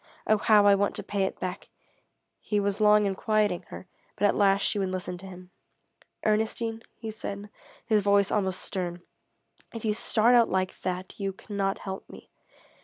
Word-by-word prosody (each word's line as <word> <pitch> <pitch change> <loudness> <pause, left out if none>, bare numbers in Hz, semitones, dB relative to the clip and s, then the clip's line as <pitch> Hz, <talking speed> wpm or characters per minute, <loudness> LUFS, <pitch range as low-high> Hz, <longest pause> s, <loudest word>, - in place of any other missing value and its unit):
Oh 215 - +4
how 210 -1 +5
I 200 - +7
want 200 0 +1
to - - -4
pay 200 -1 -1
it - - -5
back!" 185 +1 -5 0.7
He 210 - -1
was 200 +1 -1
long 210 0 +5
in 195 - 0
quieting 210 -2 0
her, - - -9 0.3
but 205 - +1
at 205 - +4
last 200 -1 +3
she 210 - +1
would 190 -1 0
listen 185 -1 -4
to 195 - -10
him. 180 -1 -12 0.7
"Ernestine," 220 +1 0 0.2
he 225 -1 -6
said, 205 -1 -7 0.3
his 215 -3 +3
voice 200 0 +3
almost 190 -3 0
stern, 175 -2 -4 0.7
"if 230 - -5
you 215 - +2
start 225 +2 +3
out 235 -2 +5
like 185 0 -1
that 185 +2 -4
you 195 -1 -1
cannot 195 0 -2
help 190 -1 -7
me. - - -13
200 Hz, 180 wpm, -27 LUFS, 190-215 Hz, 0.7 s, I